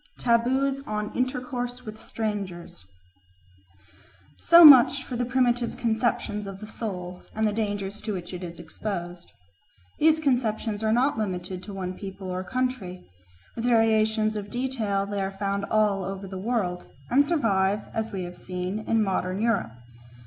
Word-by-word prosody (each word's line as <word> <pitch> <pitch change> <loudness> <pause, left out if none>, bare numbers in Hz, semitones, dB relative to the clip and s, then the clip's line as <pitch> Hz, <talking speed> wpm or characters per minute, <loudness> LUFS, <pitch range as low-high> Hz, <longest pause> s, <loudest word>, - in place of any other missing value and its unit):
Taboos 260 +3 +1
on 210 0 -3
Intercourse 250 -1 -3
with 215 0 -8
Strangers 195 - -5 1.5
SO 340 0 +8
much 275 -1 +9
for 255 - -6
the 245 +1 -1
primitive 245 -1 +1
conceptions 225 -2 -1
of 195 -1 -7
the 215 - -8
soul 180 -5 -6
and 220 0 +2
the 210 - -1
dangers 205 -1 -3
to 215 -1 -3
which 180 -1 -6
it 180 - -6
is 170 -1 -8
exposed. 175 0 -6 0.7
These 315 +1 +4
conceptions 225 -6 0
are 220 - +2
not 245 +1 +2
limited 185 -3 -3
to 200 +2 -9
one 185 -1 -4
people 190 -1 -7
or 185 +1 -3
country; 250 - -3 0.5
with 230 - -3
variations 220 -2 +3
of 205 -1 -5
detail 225 -5 -1
they 200 0 -3
are 195 0 -4
found 200 0 -1
all 210 -3 +2
over 195 +1 -5
the 190 - -8
world, 195 -5 -2 0.2
and 275 +4 +6
survive, 210 - +1
as 225 0 -2
we 190 -3 -3
have 175 0 -8
seen, 180 +2 -4
in 225 -1 +3
modern 185 -1 -1
Europe. 220 - 0
215 Hz, 155 wpm, -26 LUFS, 190-240 Hz, 1.5 s, much